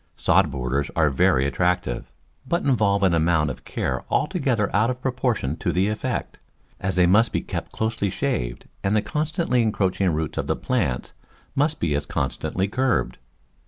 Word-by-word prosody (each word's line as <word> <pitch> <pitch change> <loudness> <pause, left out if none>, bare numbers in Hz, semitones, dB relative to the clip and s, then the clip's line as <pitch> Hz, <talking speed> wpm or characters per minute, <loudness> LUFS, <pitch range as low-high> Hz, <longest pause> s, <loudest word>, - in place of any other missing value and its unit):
Sod - - +3
borders 65 +2 -2
are 80 -3 +3
very 65 0 +3
attractive, 90 -3 -1 0.4
but 170 +4 0
involve 105 -7 +2
an 95 -3 +4
amount 80 -2 +2
of 65 -1 -10
care - - -2
altogether 135 - 0
out 110 +4 +3
of 125 0 -3
proportion 125 - -1
to - - -1
the 95 +3 +1
effect, 105 - -3 0.4
as 95 - -2
they 90 -1 +5
must 105 +6 +4
be - - 0
kept - - -5
closely 110 -2 -1
shaved - - -2 0.2
and 95 +2 +1
the 105 - +2
constantly 150 +1 0
encroaching 100 -4 +1
roots 80 -2 -2
of - - -2
the - - +1
plants 65 -1 -1 0.4
must 145 +3 +1
be 80 -3 0
as 75 +1 -2
constantly 95 +5 -1
curbed. 125 - 0
100 Hz, 165 wpm, -24 LUFS, 80-120 Hz, 0.4 s, they